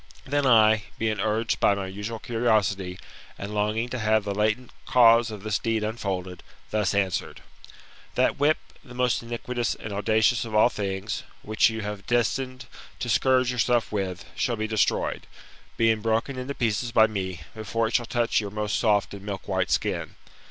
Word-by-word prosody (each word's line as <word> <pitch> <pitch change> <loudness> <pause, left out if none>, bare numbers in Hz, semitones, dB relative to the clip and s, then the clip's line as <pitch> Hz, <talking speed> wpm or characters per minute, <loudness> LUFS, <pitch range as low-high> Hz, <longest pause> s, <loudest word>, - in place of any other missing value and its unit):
Then 145 0 +1
I, 110 -3 +5
being 110 -2 -1
urged 110 +3 0
by 100 - +4
my 100 -1 -3
usual 105 +4 -5
curiosity, 105 -6 0 0.4
and 100 +1 -6
longing 105 +3 0
to 130 - -4
have 110 -1 +2
the 100 - -3
latent 110 +4 0 0.2
cause 115 -1 +6
of 105 -2 -8
this 110 -2 0
deed 115 -2 -1
unfolded, 95 -5 -3 0.3
thus 105 -2 +1
answered: 95 -3 -1 0.7
That - - +2
whip, 150 +2 +4 0.3
the 125 -4 -13
most 125 -1 +1
iniquitous 120 0 -3
and 105 - -7
audacious 110 +3 +2
of 110 -2 -5
all 105 +3 +6
things, 100 -1 -3 0.2
which 110 +1 +3
you 110 0 -4
have 105 -1 -6
destined 130 +2 0 0.3
to 120 - -4
scourge 130 +1 +3
yourself 120 -1 +1
with, 95 -3 -3
shall 120 - 0
be 110 -1 -2
destroyed, 110 -1 0 0.5
being 115 -1 +3
broken 115 +5 0
in 130 +2 -5
pieces 115 0 -1
by 110 -1 +6
me, 95 -5 -4
before 110 +1 -1
it 110 - -6
shall 120 -2 +1
touch 120 -1 +1
your 105 - -5
most 105 0 -2
soft 105 -4 +2
and 100 -1 -9
milk 100 -2 -6
white 95 -2 0
skin. - - -1
110 Hz, 175 wpm, -26 LUFS, 105-120 Hz, 0.7 s, cause